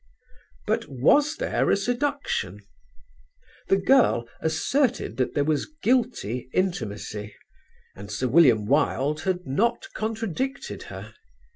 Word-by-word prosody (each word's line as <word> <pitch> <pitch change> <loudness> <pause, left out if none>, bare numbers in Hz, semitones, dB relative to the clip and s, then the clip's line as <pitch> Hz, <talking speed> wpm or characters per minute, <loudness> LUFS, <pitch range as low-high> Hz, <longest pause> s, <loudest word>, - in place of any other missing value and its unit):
But - - 0
was 285 - +3
there - - 0
a - - +4
seduction? 245 - -2 1.1
The 195 - +4
girl 195 - +3
asserted 230 - 0
that 130 - -1
there 145 - +2
was 150 - 0
guilty 225 - 0
intimacy, 105 - -3 0.6
and 100 +1 -9
Sir 115 +6 -1
William 125 -6 +5
Wilde 145 +3 +1
had 185 -1 -1
not 235 - 0
contradicted 225 - -3
her. - - -9
160 Hz, 110 wpm, -25 LUFS, -, 1.1 s, William